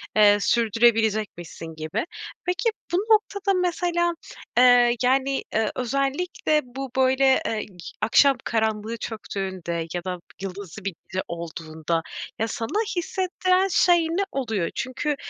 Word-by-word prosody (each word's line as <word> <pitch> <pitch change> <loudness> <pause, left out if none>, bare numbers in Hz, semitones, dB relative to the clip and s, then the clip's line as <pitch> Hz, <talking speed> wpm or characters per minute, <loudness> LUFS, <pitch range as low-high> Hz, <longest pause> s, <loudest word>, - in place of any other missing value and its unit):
eee, 205 -1 +7
sürdürebilecekmişsin 220 -8 +1
gibi. 155 - -3 0.4
Peki, 365 +6 +1 0.2
bu 350 - +4
noktada 405 -2 +2
mesela, 345 -1 +1 0.4
eee, 245 -1 +6
yani, 270 +2 +2
ııı, 220 -1 +2
özellikle 275 +5 0
bu, 260 +2 -7
böyle, 265 +2 +4
ııı, 220 - -1
g 195 -4 -8 0.2
akşam 260 +4 +5
karanlığı 220 0 -1
çöktüğünde 190 -6 -4
ya 175 -1 -3
da 180 -1 -4 0.2
yıldızlı 195 0 -7
bir 195 - -2
gece 185 - -2
olduğunda 165 -1 -3 0.4
ya 225 - +1
sana 230 - -1
hissettiren 370 +1 +1
şey 355 -1 +5
ne 340 +4 0
oluyor? 220 -10 -1
Çünkü 265 +3 -2
235 Hz, 120 wpm, -24 LUFS, 195-300 Hz, 0.4 s, eee